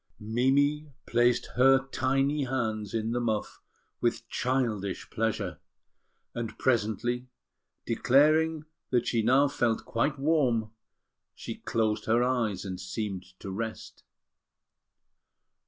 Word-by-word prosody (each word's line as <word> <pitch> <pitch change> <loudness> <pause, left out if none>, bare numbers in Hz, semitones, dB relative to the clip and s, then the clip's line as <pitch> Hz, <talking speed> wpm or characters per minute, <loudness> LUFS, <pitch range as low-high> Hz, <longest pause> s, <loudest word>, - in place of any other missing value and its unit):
Mimi 140 +7 +1
placed 120 0 +2
her 135 +1 +5
tiny 135 +3 +1
hands 110 -5 -2
in 110 0 -1
the 120 - 0
muff 110 -3 -2 0.4
with 120 0 -1
childish 115 -7 -1
pleasure; 105 -5 -2 0.7
and 115 -2 -5
presently, 120 +1 0 0.6
declaring 155 +6 +3 0.2
that 120 -2 +1
she 115 - +1
now 130 +6 +4
felt 120 -5 0
quite 140 +5 0
warm, 135 -7 +1 0.6
she - - -6
closed 110 -2 -1
her 115 +2 +3
eyes 115 -7 0
and 95 -2 -5
seemed 95 -1 -5
to 100 - -6
rest. 110 +3 -6
120 Hz, 105 wpm, -28 LUFS, 110-135 Hz, 0.7 s, her